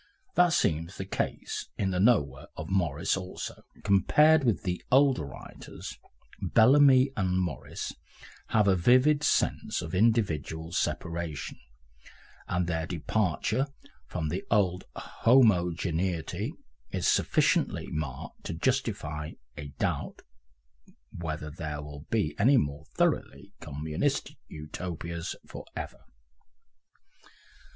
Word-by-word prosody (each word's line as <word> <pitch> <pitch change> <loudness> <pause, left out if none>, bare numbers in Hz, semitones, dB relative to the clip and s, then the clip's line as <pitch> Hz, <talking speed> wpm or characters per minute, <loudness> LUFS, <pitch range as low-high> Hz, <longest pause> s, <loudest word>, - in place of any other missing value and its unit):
That 180 -1 +5
seems 85 - 0
the 95 - -4
case 95 - -3
in 95 -2 0
the 90 - -1
"Nowhere" 75 - +2
of - - -6
Morris 85 -2 +1
also. 95 -1 -6 0.2
Compared 150 +10 +5
with 115 -4 +1
the 90 -3 -2
older 135 - +5
writers 70 - -9 0.5
Bellamy 135 +2 +6
and 95 -3 0
Morris 85 -7 -4 0.5
have 105 -2 +3
a 95 - +5
vivid 130 - +4
sense - - +1
of 85 +1 -7
individual 90 -7 +1
separation, 85 -3 -3 0.9
and 90 0 0
their 80 -1 -2
departure 95 - 0 0.4
from 80 -1 -3
the 90 +5 -3
old 95 -3 +2
homogeneity 90 - +2 0.4
is - - -1
sufficiently - - +2
marked 75 0 -5
to - - -3
justify 75 0 -1 0.2
a 75 0 -7
doubt - - -2 0.9
whether 75 -3 -4
there 75 -2 -5
will 75 +1 -10
be 105 -10 +1
any 130 +7 +6
more 70 - -1
thoroughly - - 0
communistic 75 +2 -2
Utopias 85 +2 -5
for - - -9
ever. - - -6
90 Hz, 110 wpm, -29 LUFS, 80-110 Hz, 0.9 s, Bellamy